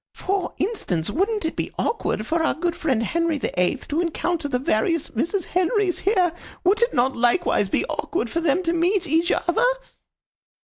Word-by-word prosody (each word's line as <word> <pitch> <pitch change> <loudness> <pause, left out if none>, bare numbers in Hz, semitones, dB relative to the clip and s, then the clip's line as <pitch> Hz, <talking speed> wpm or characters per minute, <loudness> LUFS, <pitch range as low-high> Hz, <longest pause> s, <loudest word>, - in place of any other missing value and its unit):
For 390 0 -2
instance, 205 - -1
wouldn't 400 - 0
it 320 - -2
be - - -3
awkward 215 - -1
for 325 +7 0
our 320 - +1
good 340 +1 -1
friend 260 -8 0
Henry 335 +5 0
the 225 - -3
Eighth 180 - 0
to 310 +4 +1
encounter 335 -1 -1
the 265 -3 0
various 280 +6 0
Mrs. 335 - -1
Henrys 370 +1 +1
here? 370 -4 +2 0.3
Would 395 +5 +3
it 475 +1 +3
not 260 +2 +2
likewise 235 - +2
be - - +1
awkward 335 - -2
for 335 +8 -2
them 335 +3 +2
to 335 -1 0
meet 355 +3 +1
each 330 +4 +2
other?" 405 +8 +1
335 Hz, 180 wpm, -23 LUFS, 275-370 Hz, 0.3 s, Would